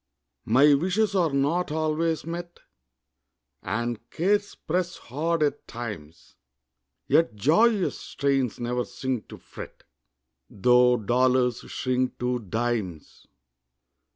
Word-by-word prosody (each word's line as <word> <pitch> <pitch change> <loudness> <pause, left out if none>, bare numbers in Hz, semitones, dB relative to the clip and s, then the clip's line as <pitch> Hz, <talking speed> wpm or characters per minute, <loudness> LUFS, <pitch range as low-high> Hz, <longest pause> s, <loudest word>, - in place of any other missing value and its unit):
My 140 +6 +5
wishes 190 +8 +1
are 180 -4 +2
not 145 +5 0
always 155 0 0
met, 175 +1 -7 1.0
And 120 0 -2
cares 205 +4 0
press 175 +1 -2
hard 155 +5 -1
at 145 -1 -1
times; 90 -10 -8 0.7
Yet 165 -9 +3
joyous 190 - +3
strains 135 -4 -1
ne'er 125 +1 -1
sink 130 -4 -4
to - - -10
fret, - - -11 0.7
Tho' 125 +4 +4
dollars 125 +2 +2
shrink 130 0 -1
to 125 0 -1
dimes. 110 -6 -4
135 Hz, 100 wpm, -26 LUFS, 120-165 Hz, 1.0 s, My